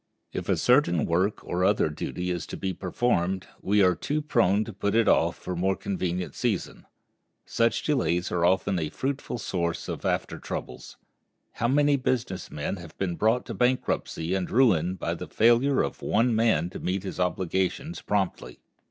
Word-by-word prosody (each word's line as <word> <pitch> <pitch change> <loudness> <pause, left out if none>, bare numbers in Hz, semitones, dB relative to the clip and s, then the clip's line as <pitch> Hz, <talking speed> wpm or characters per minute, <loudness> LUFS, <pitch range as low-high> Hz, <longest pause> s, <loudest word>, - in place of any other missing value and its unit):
If - - -4
a - - +3
certain 125 - +3
work 95 +5 0
or 90 +1 -1
other 100 -2 +3
duty 90 +4 -4
is 85 -1 -3
to - - -6
be 95 -1 -2
performed, 95 -1 0 0.2
we 100 +1 +3
are 90 -1 +5
too 145 - -2
prone 110 -9 +2
to 110 - -8
put 100 +2 -1
it 115 -1 +4
off 85 +1 +3
for 90 - -5
a - - -3
more 95 +2 +1
convenient 90 -2 -3
season. 115 -7 -3 0.6
Such 115 0 +1
delays 90 - 0
are 85 -1 0
often 95 +1 +2
a 80 -2 -2
fruitful 135 - -3
source 85 -6 -2
of - - -5
after - - -1
troubles. - - -7 0.5
How 115 - -1
many 145 +2 +3
business 120 -8 -2
men 75 +6 -3
have 85 -3 -12
been 90 -3 -1
brought 110 +6 +2
to - - -5
bankruptcy 125 -8 0
and 95 -2 -1
ruin 95 -8 +3
by - - -2
the - - -6
failure 120 +5 +3
of - - -5
one 115 +2 +2
man 110 -5 +2
to - - -7
meet 95 +1 -2
his 95 - -6
obligations 95 - -1
promptly! 95 -11 -2
95 Hz, 180 wpm, -27 LUFS, 90-115 Hz, 0.6 s, are